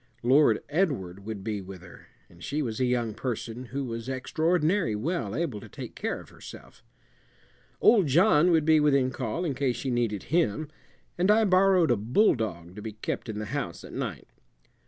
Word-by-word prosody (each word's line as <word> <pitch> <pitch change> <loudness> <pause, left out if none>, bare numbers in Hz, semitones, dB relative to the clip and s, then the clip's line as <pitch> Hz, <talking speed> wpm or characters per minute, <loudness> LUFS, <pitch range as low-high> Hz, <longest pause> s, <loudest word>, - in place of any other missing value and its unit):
Lord 135 +5 +4
Edward 115 - -2
would 105 -3 -5
be 105 -1 -3
with 95 -2 -10
her, 90 - -14 0.2
and 85 0 -17
she 150 +2 -2
was 115 -3 -4
a 130 - +2
young 120 -3 0
person 120 +1 -5
who 135 +3 -4
was 115 0 -5
extraordinary 160 - 0
well 115 - -2
able 145 -10 -2
to - - -12
take - - -8
care - - -3
of - - -14
herself. - - -13 1.0
Old 205 -8 +5
John 150 +3 +4
would 160 -3 +3
be 160 -1 +5
within 140 -3 +3
call 130 +7 -3
in 150 - -1
case 130 -2 0
she 130 +2 -3
needed 115 -5 -1
him, 155 -3 +1 0.5
and 185 +3 +2
I 220 +1 +5
borrowed 185 -5 +4
a 120 - +3
bulldog 110 - 0
to - - -6
be 110 0 -6
kept 110 +2 -5
in 105 - -4
the 105 - -4
house - - -4
at - - -11
night. - - -5
130 Hz, 185 wpm, -27 LUFS, 110-160 Hz, 1.0 s, Old